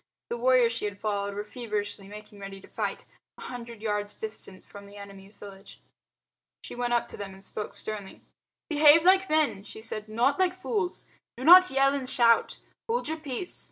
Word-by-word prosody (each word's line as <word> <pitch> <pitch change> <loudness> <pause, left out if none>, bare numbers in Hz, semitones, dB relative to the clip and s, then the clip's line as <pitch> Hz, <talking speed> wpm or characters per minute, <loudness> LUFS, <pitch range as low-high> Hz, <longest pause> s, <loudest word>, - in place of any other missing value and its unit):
The 235 - -3
warriors 245 -1 +4
she 230 - -3
had 205 -1 -4
followed 200 -1 -2
were 205 - -3
feverishly 210 -3 -4
making 210 0 -12
ready 195 0 -8
to - - -16
fight, - - -4 0.3
a - - -13
hundred 235 -3 -8
yards 210 -1 -3
distant 210 -3 -7
from 200 0 -12
the 200 +1 -14
enemy's 200 0 -12
village. 195 -1 -12 0.8
She - - -8
went 245 0 -2
up 240 - +1
to - - -10
them 200 -1 -7
and 190 0 -15
spoke 210 +1 -6
sternly. 210 -3 -5 0.5
"Behave 305 +1 +6
like 380 +1 +5
men," 305 -10 +1
she 220 +1 -11
said, 215 -1 -6
"not 245 +9 +1
like 365 -1 +2
fools. 375 -1 -3 0.3
Do 255 - -7
not 365 +4 +9
yell 275 +1 +3
and 270 -2 -3
shout. 230 -2 +3 0.3
Hold 465 -8 -1
your 320 - -2
peace. 305 +3 -5
225 Hz, 190 wpm, -27 LUFS, 205-275 Hz, 0.8 s, not